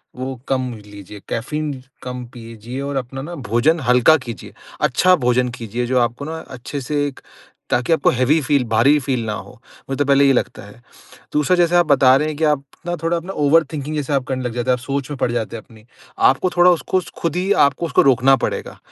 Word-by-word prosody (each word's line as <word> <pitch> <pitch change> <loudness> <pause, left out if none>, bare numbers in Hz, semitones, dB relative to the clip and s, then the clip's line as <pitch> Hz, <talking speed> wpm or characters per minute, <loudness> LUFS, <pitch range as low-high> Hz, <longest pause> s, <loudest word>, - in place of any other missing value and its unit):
वो 130 +1 -5
कम 130 -2 -1
लीजिए 100 0 -12
कैफ़ीन 150 +5 -3 0.3
कम 125 -1 -6
पीजिए 115 +1 -8
और 140 0 -4
अपना 135 +1 -5
ना 170 +4 -7
भोजन 145 +9 +2
हल्का 125 +6 +5
कीजिए। 120 - -9 0.3
अच्छा 180 +8 +4
भोजन 125 0 +2
कीजिए 120 +2 -4
जो 130 0 +2
आपको 120 +4 -1
ना 160 +1 -5
अच्छे 130 +2 -6
से 145 +2 -1
एक 135 - -8 0.5
ताकि 125 +6 +1
आपको 160 - +3
हेवी 130 +5 +2
फ़ील 145 -2 +1
भारी 135 +7 +4
फ़ील 130 -3 -2
ना 105 - -2
हो, - - -8 0.4
मुझे 135 - -2
तो 145 - +2
पहले 140 0 +4
ये 135 - +5
लगता - - -2
है। 105 +4 -15 0.5
दूसरा 150 +4 +2
जैसे 175 0 +3
आप 175 -1 +5
बता 135 -3 +5
रहे 150 +2 -1
हैं 155 - -3
कि 160 - -2
आप 150 -3 +2 0.2
ना 175 0 -2
थोड़ा 170 +1 +1
अपना 180 +4 -6
ओवर 150 +3 +4
थिंकिंग 150 +1 -4
जैसा 145 -1 -1
आप 135 - 0
करने 130 -1 -3
लग 125 - -3
जाते 120 +1 -3
हैं, - - +5
आप 125 - -2
सोच 140 +1 -4
में 145 - -4
पड़ 120 - 0
जाते 115 -1 -3
हैं 110 - -11
अपनी। 110 -3 -19 0.4
आपको 180 +7 +2
थोड़ा 180 0 +5
उसको 180 +2 0
स - - -12
ख़ुद 170 0 -1
ही 185 +2 -1
आपको 145 +2 +2
उसको 160 - +3
रोकना 135 0 +4
पड़ेगा। - - -4
135 Hz, 225 wpm, -19 LUFS, 125-150 Hz, 0.5 s, हल्का